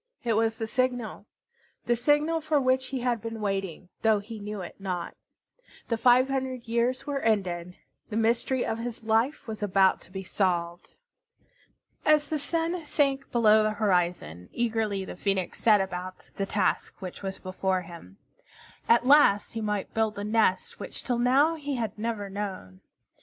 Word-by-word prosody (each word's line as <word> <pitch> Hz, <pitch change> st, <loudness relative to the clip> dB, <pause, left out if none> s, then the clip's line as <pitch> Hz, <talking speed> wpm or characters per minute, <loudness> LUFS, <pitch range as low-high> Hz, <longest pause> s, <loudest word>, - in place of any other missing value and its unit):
It 235 Hz, -2 st, +1 dB
was 225 Hz, +1 st, +1 dB
the 225 Hz, -, -2 dB
signal, 245 Hz, 0 st, -2 dB, 0.6 s
the 240 Hz, -, +2 dB
signal 295 Hz, +6 st, +2 dB
for 310 Hz, -1 st, +2 dB
which 260 Hz, 0 st, +1 dB
he 260 Hz, -1 st, -4 dB
had 240 Hz, -3 st, 0 dB
been 225 Hz, -1 st, -5 dB
waiting, 195 Hz, -4 st, -3 dB
though 220 Hz, -1 st, +4 dB
he 215 Hz, +2 st, -7 dB
knew 210 Hz, -1 st, -5 dB
it 175 Hz, -, -9 dB
not. 185 Hz, -3 st, -4 dB, 0.7 s
The 230 Hz, -, +2 dB
five 250 Hz, +2 st, +5 dB
hundred 260 Hz, -3 st, -3 dB
years 235 Hz, +2 st, 0 dB
were 285 Hz, -1 st, -2 dB
ended. 180 Hz, -6 st, -1 dB, 0.3 s
The 215 Hz, -, -3 dB
mystery 235 Hz, +3 st, +1 dB
of 225 Hz, -, -2 dB
his 235 Hz, -1 st, -5 dB
life 225 Hz, +7 st, +1 dB
was 220 Hz, -1 st, -6 dB
about 195 Hz, -2 st, +3 dB
to -, -, -13 dB
be 190 Hz, 0 st, -5 dB
solved. 175 Hz, -2 st, -2 dB, 1.1 s
As 300 Hz, -1 st, +3 dB
the 310 Hz, -, -1 dB
sun 330 Hz, +3 st, -1 dB
sank 275 Hz, -2 st, 0 dB
below 220 Hz, -2 st, +5 dB
the 215 Hz, 0 st, +1 dB
horizon, 175 Hz, -, 0 dB
eagerly 220 Hz, -4 st, -1 dB
the -, -, -7 dB
Phoenix 190 Hz, -1 st, -1 dB
set 215 Hz, -3 st, +5 dB
about 185 Hz, -1 st, -5 dB
the 195 Hz, -, -2 dB
task 195 Hz, -2 st, 0 dB
which 185 Hz, -2 st, -7 dB
was 195 Hz, -1 st, -4 dB
before 185 Hz, 0 st, -2 dB
him. 165 Hz, -, -12 dB, 0.7 s
At 235 Hz, +1 st, +5 dB
last 265 Hz, -7 st, +5 dB
he 225 Hz, -, -3 dB
might 210 Hz, -2 st, -2 dB
build 220 Hz, -1 st, 0 dB
the 200 Hz, -, -5 dB
nest 210 Hz, -3 st, +1 dB
which -, -, -6 dB
till 245 Hz, -2 st, -1 dB
now 270 Hz, +6 st, +4 dB
he 290 Hz, -3 st, -4 dB
had 230 Hz, -3 st, -3 dB
never 220 Hz, -2 st, -2 dB
known. 190 Hz, -, -6 dB
220 Hz, 170 wpm, -27 LUFS, 195-250 Hz, 1.1 s, five